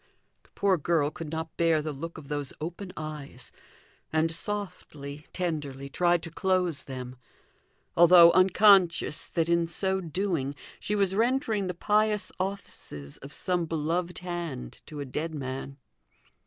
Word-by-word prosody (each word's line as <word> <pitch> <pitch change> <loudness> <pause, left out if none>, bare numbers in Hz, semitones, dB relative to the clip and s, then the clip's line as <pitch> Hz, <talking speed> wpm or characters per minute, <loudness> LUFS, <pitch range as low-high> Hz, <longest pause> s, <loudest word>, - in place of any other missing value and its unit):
The - - -28
poor 195 -2 +3
girl 155 -1 +1
could 160 0 -7
not 160 0 -4
bear 165 -2 +3
the 155 0 -3
look 165 +5 -7
of 150 -3 -10
those 145 -2 -3
open 175 +4 -6
eyes, 150 -4 -7 0.6
and 160 +1 +2
softly, 165 -6 -5
tenderly, 145 -6 -3
tried 175 +2 +2
to 165 - -7
close 180 -4 0
them, 130 -1 -7 0.8
although 170 0 +9
unconscious 185 -4 +5
that 165 -1 0
in 170 0 +2
so 190 +3 0
doing 165 -5 -1 0.2
she 210 - -1
was 195 -2 +2
rendering 225 -2 +1
the 180 - -3
pious 210 +2 +1
offices 185 - -5
of 140 - -10
some 175 +3 -1
beloved 165 +3 -1
hand 175 - -5
to 150 -2 -6
a - - -4
dead 155 +5 -4
man. 135 0 -5
165 Hz, 140 wpm, -28 LUFS, 150-185 Hz, 0.8 s, although